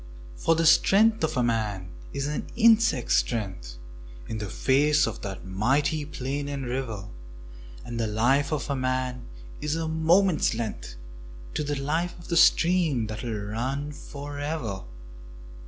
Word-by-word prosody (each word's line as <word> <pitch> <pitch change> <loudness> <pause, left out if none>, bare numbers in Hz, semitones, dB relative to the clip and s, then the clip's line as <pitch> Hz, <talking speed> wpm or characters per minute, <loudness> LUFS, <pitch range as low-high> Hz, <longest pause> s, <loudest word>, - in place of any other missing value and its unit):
For 165 - +2
the 165 +1 +1
strength 215 +6 +5
of 150 -6 +1
man 105 -6 -2 0.2
is 140 0 -3
an 150 +1 -3
insect's 220 - +4
strength 95 - -2 0.5
In 110 - -4
the 105 -2 -4
face 145 +8 +3
of - - -5
that 95 -2 -6
mighty 140 +10 +1
plain 140 0 -4
and 140 -2 -4
river, 120 -5 -4 0.8
And 120 -1 -5
the 115 - 0
life 130 +7 +2
of 150 -3 -2
a - - 0
man 130 -1 -2 0.3
is 150 +1 -1
a 165 0 -2
moment's 160 - +3
length 110 - -5 0.6
To - - -1
the 145 0 -2
life 160 +5 -1
of 170 - -13
the 170 - +1
stream 165 -9 +4
that 110 0 -6
will 115 -4 -3
run 135 +6 -2
for 145 0 -8
ever. 145 - -3
140 Hz, 150 wpm, -26 LUFS, 115-155 Hz, 0.8 s, strength